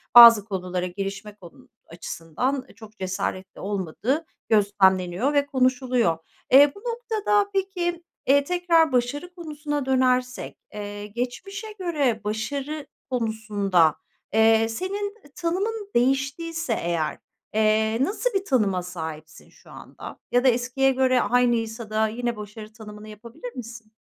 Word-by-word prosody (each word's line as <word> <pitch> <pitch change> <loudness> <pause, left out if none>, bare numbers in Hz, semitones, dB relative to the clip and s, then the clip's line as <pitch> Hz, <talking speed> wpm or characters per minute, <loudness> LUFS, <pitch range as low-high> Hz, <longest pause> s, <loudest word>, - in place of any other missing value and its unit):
bazı 230 -4 +11
konulara 185 -3 -3
girişme 195 +2 -5
konu 175 -5 -16 0.2
açısından 175 - -3
çok 220 -1 -14
cesaretli 185 0 -4
olmadığı 205 - -2 0.2
gözlemleniyor 195 +2 +3
ve 285 -1 +3
konuşuluyor. 255 - +1 0.3
Eee, 280 +2 +8
bu - - -11
noktada 440 -3 0
peki, 355 -3 -1 0.2
eee, 285 +2 +5
tekrar 340 -1 +3
başarı 280 +8 -1
konusuna 300 -4 -4
dönersek, 255 -1 +1 0.2
eee, 205 0 -6
geçmişe 250 - -5
göre 290 -11 0
başarı 280 +8 -3 0.2
konusunda, 210 - +1 0.4
eee, 225 0 +4
senin 400 - -3 0.2
tanımın 395 +5 -2
değiştiyse 270 +3 0
eğer, 170 -5 -1 0.4
eee, 220 +1 +2
nasıl 425 - 0
bir 390 0 0
tanıma 200 - +1
sahipsin 160 -3 -8
şu - - -19
anda? - - -10
Ya 245 0 +3
da 265 - +4
eskiye 255 +2 +2
göre 255 -1 +3
aynıysa 235 -2 +1
da 215 0 +2
yine 235 +1 -2
başarı 210 +1 -9
tanımını 210 -1 -11
yapabilir 235 +3 -10
misin? 230 -3 -9
240 Hz, 120 wpm, -24 LUFS, 210-290 Hz, 0.4 s, bazı